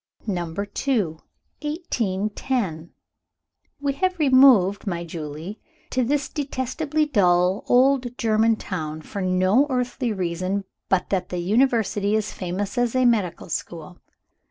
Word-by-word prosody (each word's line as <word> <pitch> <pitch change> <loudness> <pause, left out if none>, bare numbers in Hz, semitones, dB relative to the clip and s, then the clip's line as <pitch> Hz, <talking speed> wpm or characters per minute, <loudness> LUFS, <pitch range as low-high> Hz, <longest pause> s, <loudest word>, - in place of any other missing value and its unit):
Number 175 -2 -2
II. 205 - -1 0.4
1810. 215 - -2 0.9
"We 285 -1 -1
have 370 +6 0
removed, 255 - +5
my 170 -3 -2
Julie, 160 +4 -7 0.3
to 255 - +1
this 275 +3 0
detestably 290 +2 -2
dull 185 -7 +2
old 255 -1 +3
German 225 -1 +3
town, 155 -7 -5
for 200 - -6
no 185 +8 +3
earthly 250 -1 -1
reason 185 +1 -2 0.3
but 190 -2 +1
that 185 -2 -1
the 180 - -3
University 210 +1 +1
is 215 -1 -1
famous 195 +6 -3
as 245 0 0
a 255 0 +3
medical 210 -9 +1
school. 170 0 -6
210 Hz, 120 wpm, -23 LUFS, 180-255 Hz, 0.9 s, removed